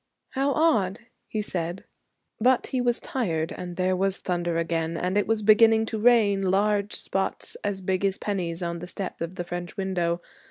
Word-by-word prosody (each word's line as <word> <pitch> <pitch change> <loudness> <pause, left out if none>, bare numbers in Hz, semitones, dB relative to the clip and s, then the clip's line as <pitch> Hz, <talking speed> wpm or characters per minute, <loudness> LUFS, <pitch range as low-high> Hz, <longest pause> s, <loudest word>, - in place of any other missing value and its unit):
'How 275 +1 0
odd!' 235 - +2 0.3
he 215 -1 -2
said. 175 -2 -3 0.6
But 250 +2 +3
he 255 - -1
was 240 0 +2
tired 165 -11 -2
and 175 -1 -6
there 185 +1 +1
was 195 +1 +1
thunder 175 -2 -1
again 165 0 -1
and 180 +3 -1
it 205 - +2
was 220 -1 +1
beginning 220 +1 +6
to 220 -1 -3
rain, 215 -4 +4
large 200 +2 +1
spots 195 0 -3
as 200 -2 -2
big 185 +1 -1
as 195 -1 +1
pennies 180 -4 -2
on 170 0 -3
the 175 - -7
step 185 -1 -5
of 165 +2 -4
the 175 - -3
French 175 0 -6
window. 175 -3 0
190 Hz, 185 wpm, -26 LUFS, 175-215 Hz, 0.6 s, beginning